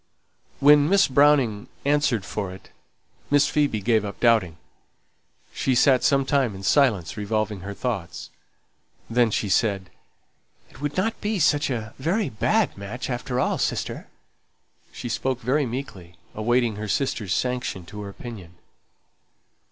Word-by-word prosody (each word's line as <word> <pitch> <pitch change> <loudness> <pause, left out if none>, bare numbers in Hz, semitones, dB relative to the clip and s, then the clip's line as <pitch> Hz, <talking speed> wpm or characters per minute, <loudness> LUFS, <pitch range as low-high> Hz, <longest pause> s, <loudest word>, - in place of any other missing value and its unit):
When 145 +1 +6
Miss 200 +1 +5
Browning 135 -6 +3 0.2
"answered 145 -8 +1
for 100 -3 -4
it" 95 +1 -13 0.6
Miss 145 -1 +4
Phoebe 145 -8 0
gave 110 0 +2
up 100 -1 -6
doubting. 110 -9 +3 1.0
She 130 - 0
sate 130 +1 +4
some 135 -1 +2
time 130 -7 +1
in 95 - -9
silence 105 - +2
revolving 105 0 -2
her 100 +2 -7
thoughts. 95 -10 -4 0.8
Then 120 0 +3
she 105 - -1
said: 100 -2 0 0.8
"It 130 - -16
wouldn't 185 +10 -2
be 210 0 -1
such 150 -3 +2
a 110 -4 -4
very 170 +6 0
bad 210 - +1
match 105 +7 -6
after 125 +1 -3
all, - - 0
sister." - - -2 0.8
She - - -7
spoke 130 +2 -2
very 135 +4 +1
meekly, 105 -9 -7 0.2
awaiting 120 0 +1
her 105 0 -5
sister's 105 -4 -1
sanction 125 -8 -2
to 105 +4 -9
her 100 - -6
opinion. 100 -5 -10
120 Hz, 135 wpm, -24 LUFS, 105-140 Hz, 1.0 s, When